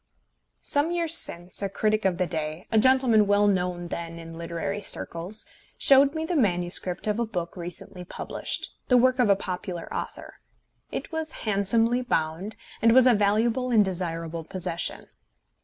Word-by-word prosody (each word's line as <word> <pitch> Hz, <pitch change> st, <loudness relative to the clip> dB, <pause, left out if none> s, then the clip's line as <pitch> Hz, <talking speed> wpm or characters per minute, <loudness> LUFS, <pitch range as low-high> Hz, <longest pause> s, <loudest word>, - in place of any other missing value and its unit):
Some 290 Hz, +3 st, 0 dB
years 335 Hz, -2 st, +8 dB
since 175 Hz, -, 0 dB
a 200 Hz, -, -1 dB
critic 215 Hz, +1 st, 0 dB
of 185 Hz, -2 st, +1 dB
the 180 Hz, -, +1 dB
day, 155 Hz, 0 st, -4 dB
a 220 Hz, -, +4 dB
gentleman 245 Hz, -3 st, +4 dB
well 205 Hz, 0 st, +3 dB
known 180 Hz, -3 st, -1 dB
then 170 Hz, -1 st, -6 dB
in 165 Hz, 0 st, -10 dB
literary 170 Hz, +5 st, -4 dB
circles, 190 Hz, +1 st, -3 dB, 0.3 s
showed 275 Hz, +2 st, +5 dB
me 315 Hz, 0 st, -2 dB
the 350 Hz, -, -2 dB
manuscript 180 Hz, -, 0 dB
of 210 Hz, +1 st, -1 dB
a 235 Hz, -, +1 dB
book 175 Hz, -5 st, -5 dB
recently 180 Hz, +1 st, -8 dB
published, 180 Hz, -, -5 dB, 0.2 s
the 250 Hz, -, +5 dB
work 255 Hz, +1 st, +3 dB
of 240 Hz, -4 st, +3 dB
a 200 Hz, -, +6 dB
popular 180 Hz, -2 st, -6 dB
author. -, -, -7 dB, 0.5 s
It -, -, -5 dB
was 320 Hz, -1 st, -3 dB
handsomely 225 Hz, +4 st, +2 dB
bound, 180 Hz, -2 st, -2 dB, 0.3 s
and 230 Hz, 0 st, +5 dB
was 260 Hz, 0 st, +6 dB
a 250 Hz, -, +6 dB
valuable 225 Hz, +5 st, +1 dB
and 220 Hz, -4 st, +4 dB
desirable 165 Hz, -3 st, -4 dB
possession. 175 Hz, 0 st, -4 dB
200 Hz, 160 wpm, -25 LUFS, 175-235 Hz, 0.5 s, years